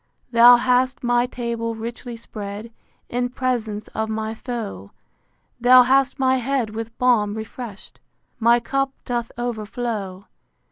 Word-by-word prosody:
Thou 240 +1 +9
hast 250 +1 +1
my 245 0 +2
table 235 -2 -3
richly 235 +1 -6
spread 210 0 -7 0.4
In 245 +1 -1
presence 235 -5 -2
of 220 0 -3
my 220 0 -3
foe: 220 - -6 0.7
Thou 250 +1 +8
hast 270 +2 +2
my 260 -1 +3
head 255 -3 -1
with 225 +1 -6
balm 220 -5 +2
refresh'd, 220 -1 -8 0.4
My 235 +1 +5
cup 275 +3 -1 0.2
doth 240 -2 -2
overflow. 215 -4 -4
235 Hz, 125 wpm, -22 LUFS, 220-250 Hz, 0.7 s, Thou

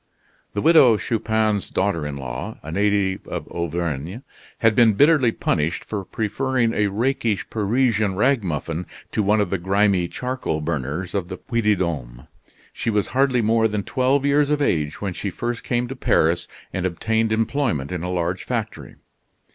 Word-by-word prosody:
The 100 - -1
Widow 135 -9 +6
Chupin's 110 -1 0
daughter 90 -6 0
in 70 -1 -5
law, 70 - -6
a 80 - -7
native 100 0 0
of - - -5
Auvergne, 85 - -3 0.4
had 115 -1 +3
been 115 0 +5
bitterly 145 0 +4
punished 80 -6 -1
for 105 -2 -4
preferring 115 +3 0
a 105 -1 +2
rakish 115 0 -1
Parisian 110 -2 +1
ragamuffin 90 - 0 0.2
to - - 0
one 105 +1 +3
of 105 - 0
the 95 - 0
grimy 95 -1 +2
charcoal 125 -8 -3
burners 75 +3 -3
of 95 -4 -1
the - - -6
Puy 115 -2 -2
de 105 -1 +3
Dome. 70 -10 -4 0.5
She - - -2
was 105 -3 0
hardly 130 -2 +2
more 110 +1 +3
than 105 -2 -2
twelve 135 +3 +1
years 145 0 +3
of 150 0 +1
age 75 - 0
when 100 -3 -2
she 100 - -4
first 120 +5 -4
came 120 0 0
to 135 - -6
Paris 85 -8 +2 0.3
and 95 -1 0
obtained 110 +5 0
employment 110 - 0
in 90 -2 -3
a 90 - -3
large 90 0 -1
factory. - - -4
105 Hz, 165 wpm, -22 LUFS, 85-115 Hz, 0.5 s, Widow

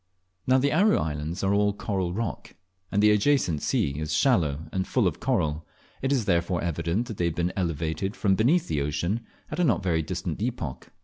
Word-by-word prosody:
Now 130 +1 +5
the 140 +3 +2
Aru 205 +7 +4
Islands 80 +4 -3
are 95 +1 +2
all 105 0 +2
coral 100 -4 -2
rock, 115 +4 -4 0.4
and 100 +1 +2
the 105 - +7
adjacent 105 - +2
sea 70 +1 0
is 75 0 -3
shallow 80 - +2
and 95 0 -2
full - - +1
of - - -2
coral, 75 +1 0 0.4
it 135 - 0
is 130 -6 +1
therefore 85 -2 +1
evident 85 +6 -1
that 110 -4 -7
they 85 - 0
have 85 -2 -1
been 85 +1 -1
elevated 85 +2 -2
from 100 -5 +2
beneath 130 - +3
the 75 -3 -1
ocean 75 +9 -1 0.3
at 155 - -4
a - - +3
not 110 - +2
very 85 -3 +1
distant 80 - -4
epoch. 110 - -4
95 Hz, 200 wpm, -26 LUFS, 80-115 Hz, 0.4 s, the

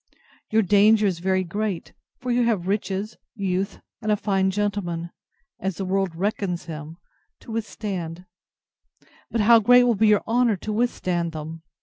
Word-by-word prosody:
Your 220 0 +3
danger 210 +2 +5
is 185 -4 0
very 190 +1 +1
great; 200 +1 -3 0.2
for 250 0 -3
you 240 0 +3
have 210 -7 0
riches, 200 +1 -2 0.2
youth, 195 -1 -2 0.2
and 215 -1 0
a 210 - +3
fine 195 -2 +1
gentleman, 190 -4 -2 0.5
as 190 -3 -3
the 195 - -3
world 190 -2 0
reckons 185 -1 -2
him, 155 0 -8 0.4
to - - -10
withstand; 190 -6 -4 1.0
but 230 -1 0
how 230 +2 +7
great 245 +3 +6
will 245 -1 +3
be 220 +1 +3
your 210 -1 +4
honour 235 -1 +3
to 215 +4 -4
withstand 180 -7 -1
them! 160 +1 -7
200 Hz, 155 wpm, -24 LUFS, 180-215 Hz, 1.0 s, how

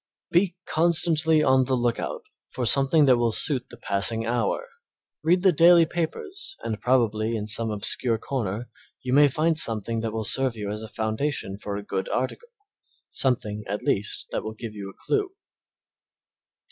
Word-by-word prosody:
Be 175 0 +2
constantly 160 -1 +2
on 130 0 +4
the 130 +1 0
lookout 120 -1 -2 0.3
for 125 - -3
something 140 +5 +4
that 130 -3 +5
will 120 -1 +1
suit 130 +1 +1
the 120 - -12
passing 110 +1 -1
hour, 115 -2 -1 0.5
read 180 +4 +2
the 190 - +6
daily 170 +1 +6
papers 380 - -5
and 110 -2 -4
probably 115 -3 +1
in 105 -2 -3
some 110 +1 0
obscure 110 +3 0
corner 115 -2 -4 0.4
you 125 0 -2
may 145 +1 +7
find 155 +3 +1
something 115 -1 +1
that 110 0 -3
will 110 0 -3
serve 130 +2 0
you 105 -1 -4
as 105 +1 -5
a 110 - -7
foundation 110 -1 -3
for 100 -1 -5
a 100 - -6
good 95 -2 -3
article 465 - -3 0.6
something, 105 -5 0
at 100 +2 -4
least, 105 +2 -1
that - - -2
will 110 0 -6
give 110 -1 -7
you 100 -2 -7
a - - -15
clue. 405 -3 0
120 Hz, 170 wpm, -25 LUFS, 110-155 Hz, 0.6 s, may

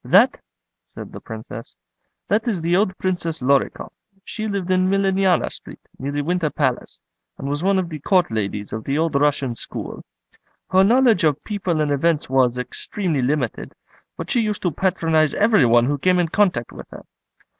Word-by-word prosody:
"That?" - - +4 0.5
said - - -10
the - - -9
Princess; 110 0 -9 0.5
"that 215 +4 0
is 210 -7 0
the 170 +2 +1
old 190 -1 +1
Princess 175 -3 -2
Lorikoff. 135 +2 0 0.3
She 215 -1 -4
lived 195 -3 -2
in 185 0 +3
Millionaya 195 -2 +2
Street, - - -10 0.2
near 135 +2 -3
the 145 0 -2
Winter 170 0 0
Palace, 130 -4 -2 0.4
and 135 - -6
was 145 +2 -2
one 195 +2 +2
of 185 -2 0
the 155 -2 -6
Court 180 - +2
ladies 105 -1 -3
of 110 0 -4
the 140 +1 -1
old 160 0 0
Russian 140 -3 +1
school. 115 - -7 0.7
Her 190 +1 +5
knowledge 230 -2 +4
of 150 -3 +1
people 185 -7 -2
and 150 -1 0
events 150 +2 +1
was 130 -2 +2
extremely 155 +4 -3
limited; 130 -3 -2 0.4
but - - -6
she 240 - +2
used 210 -2 -2
to 175 - +1
patronise 165 -3 +1
every 210 - +4
one 120 +1 +4
who 145 +2 -1
came 185 +4 +3
in 175 -2 +1
contact 175 - +1
with - - -11
her. - - -12
165 Hz, 180 wpm, -21 LUFS, 140-190 Hz, 0.7 s, Her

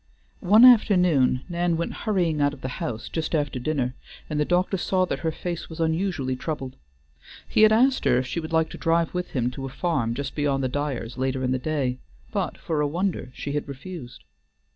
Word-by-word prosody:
One 215 +6 +7
afternoon 180 - +5
Nan 175 -1 0
went 170 - -2
hurrying 175 -8 0
out 145 0 +2
of 135 - -18
the - - -3
house 115 -1 -4
just 160 0 -2
after 145 -4 -1
dinner, 125 -2 -1 0.4
and 150 - -1
the 150 - +2
doctor 180 +3 +1
saw 185 +1 +1
that - - -3
her 160 - -1
face 170 +1 -5
was 160 0 -9
unusually 160 -5 0
troubled. 135 -1 -5 0.7
He - - +2
had 215 0 +7
asked 255 +4 +3
her 120 - +4
if 125 - 0
she 150 - -3
would 160 -1 -6
like 160 0 +2
to - - -9
drive 165 0 +1
with 180 0 -3
him 125 -2 0
to 135 +1 -6
a - - -6
farm 135 -5 -1
just 140 0 -4
beyond 140 -2 0
the 130 - 0
Dyers' 130 -4 -3
later 130 0 -1
in 125 - 0
the 130 - 0
day, 130 -3 -1 0.3
but - - -2
for 155 -2 -2
a 145 - +2
wonder 170 -4 -2
she 140 - -5
had 145 0 -2
refused. 140 -1 -9
155 Hz, 210 wpm, -25 LUFS, 130-175 Hz, 0.7 s, One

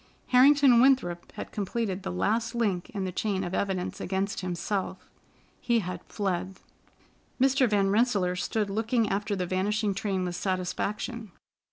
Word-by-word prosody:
Harrington 265 -1 +6
Winthrop 250 -11 +2
had - - -7
completed 205 -1 -2
the - - -5
last 225 - 0
link 205 -4 -1
in 205 -6 -4
the 185 - -2
chain 195 0 -1
of 175 0 -4
evidence 190 -2 -2
against 195 +2 -2
him: 180 -1 -3 1.0
he 240 -1 +1
had 180 -4 -3
fled. 185 -2 -3 0.8
Mr. 265 -1 +3
Van 200 -2 +2
Rensselaer 205 -5 +2
stood 205 +2 -1
looking 225 +1 +1
after 205 +1 -1
the 185 -2 -2
vanishing 200 +3 0
train 190 -2 -2
with 175 -1 -3
satisfaction. 200 +4 -3
200 Hz, 145 wpm, -28 LUFS, 185-230 Hz, 1.0 s, Harrington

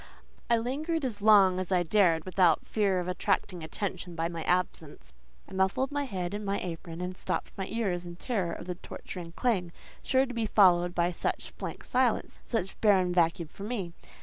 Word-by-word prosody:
I 235 - +5
lingered 290 +7 -1
as 215 -5 -3
long 200 -3 +6
as 185 0 -3
I 180 -1 +3
dared 170 -3 +3
without 185 -3 +3
fear 200 -4 +1
of 180 - -3
attracting 185 -1 -1
attention 180 +1 -4
by 165 0 -1
my 170 -1 -5
absence. 155 - -2 0.3
I - - -12
muffled 190 +8 +1
my 285 0 -1
head 185 -6 -4
in 210 +1 -4
my 200 0 -1
apron, 170 -1 -6
and 180 +1 -4
stopped - - -3
my 190 -1 -4
ears 195 -6 -1
in 175 -1 -8
terror 190 -3 -2
of - - -7
the 180 - -3
torturing 175 -1 -8
clang, 185 -6 0 0.3
sure 265 0 +2
to 250 - -7
be 230 -2 -1
followed 175 -4 +4
by 175 +1 +2
such 170 - -3
blank - - -6
silence, 250 -2 +1
such 205 -6 -3
barren 190 -4 +4
vacuum 170 -1 +2
for - - -14
me. 200 -6 -3
185 Hz, 190 wpm, -29 LUFS, 175-215 Hz, 0.3 s, long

